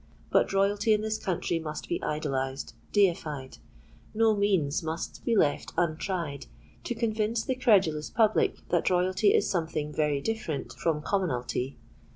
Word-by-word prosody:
But - - +3
royalty 200 +3 +2
in 210 - +1
this 220 0 -2
country 175 -2 -1
must 155 -1 -6
be 170 - -2
idolized—deified: 140 - -1 0.6
no 220 0 +4
means 190 -8 +1
must 160 0 -5
be 235 - +1
left 145 -6 +1
untried 165 -3 -2 0.4
to 240 - -2
convince 225 0 0
the 260 - 0
credulous 195 - +3
public 220 -1 +2
that 175 - +2
royalty 185 +3 +3
is - - +2
something 160 -5 -2
very 150 -2 +1
different 220 -5 -3
from 155 -3 -1
commonalty. 135 -8 -1
175 Hz, 135 wpm, -28 LUFS, 150-210 Hz, 0.6 s, no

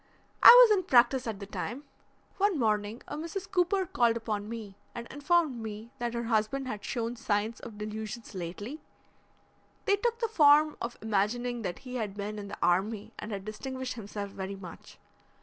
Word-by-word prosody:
"I - - +9
was 485 -3 +10
in 370 -3 -2
practice 255 -4 +4
at 215 -3 -4
the 200 - -6
time. 240 +6 -5 0.5
One 400 -3 +2
morning 215 -2 0
a - - -5
Mrs. 335 +5 -5
Cooper 375 +1 +2
called 235 -8 +2
upon 215 -2 -3
me 220 -4 -7 0.2
and 235 - -5
informed 290 -2 +1
me 220 +1 -7
that 240 0 -2
her 235 - -2
husband 230 +4 0
had 210 -5 -5
shown 235 -1 -3
signs 215 0 -1
of 220 -3 -10
delusions 215 +2 -6
lately. 200 - -6 1.0
They 400 - +3
took 470 +3 0
the 465 -1 -1
form 305 -6 +5
of 235 +1 -4
imagining 230 +3 0
that 180 -5 -4
he 250 0 -5
had 210 -4 -3
been 210 +1 -4
in 200 - -7
the 200 - -7
army 200 +4 0
and 215 - -6
had 195 -1 -5
distinguished 260 +4 -5
himself 205 -3 -6
very 195 0 -5
much. 185 -3 -11
230 Hz, 180 wpm, -29 LUFS, 210-275 Hz, 1.0 s, was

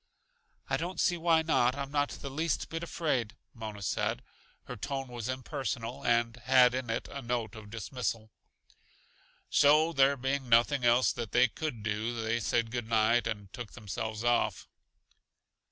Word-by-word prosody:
"I - - +1
don't 175 +3 -4
see 175 - +3
why 165 -1 +3
not; 130 -6 +2
I'm 140 -1 -5
not 145 -1 +1
the 140 - -7
least 160 +2 -1
bit 165 0 -4
afraid," 145 -9 -1 0.2
Mona 110 -3 -7
said. - - -1 0.4
Her 125 - -7
tone 135 +4 -4
was 120 -1 -5
impersonal 130 -2 -4
and 115 0 +1
had 125 +1 +5
in 130 -2 -3
it 115 - -2
a 140 - -6
note 120 -3 -2
of 110 -2 -10
dismissal. 110 +1 -4 1.2
So, 155 +3 +5
there 140 -1 +4
being 135 0 -2
nothing 120 +4 +4
else 120 +1 +4
that 115 -3 -6
they 125 +1 +5
could 120 -4 -5
do, 110 +3 -2
they 115 +1 0
said 115 0 0
good 120 -2 -4
night 115 +1 +3
and 105 -4 -5
took 120 -4 -7
themselves 110 0 -5
off. 120 0 +1
120 Hz, 160 wpm, -30 LUFS, 115-140 Hz, 1.2 s, had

